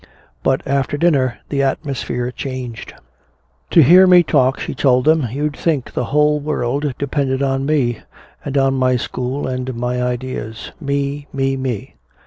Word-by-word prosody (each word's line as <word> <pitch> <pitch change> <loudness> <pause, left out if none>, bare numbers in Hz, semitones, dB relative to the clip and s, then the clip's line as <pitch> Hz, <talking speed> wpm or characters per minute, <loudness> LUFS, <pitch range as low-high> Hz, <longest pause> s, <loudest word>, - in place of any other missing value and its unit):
But 130 - +1
after 140 +1 0
dinner 140 -7 +2
the 140 -1 0
atmosphere 135 -3 -2
changed. 125 -3 -6 0.7
"To 165 - +6
hear 180 +7 +7
me 180 -1 +7
talk," 130 -4 +2
she - - -4
told 130 -2 +2
them, 155 -4 +3
"you'd 145 +3 -2
think 150 -7 -1
the - - -1
whole 150 +1 +2
world 145 -1 -1
depended 140 -1 -1
on 135 0 0
me, 130 -7 +1 0.4
and 140 0 -3
on 135 0 +3
my 130 -1 +2
school 125 +3 -3
and 130 -1 -3
my 125 +1 -2
ideas. 125 -3 -4
Me, 140 0 -2
me, 135 0 0
me! 130 -6 -4
135 Hz, 150 wpm, -18 LUFS, 125-145 Hz, 0.7 s, hear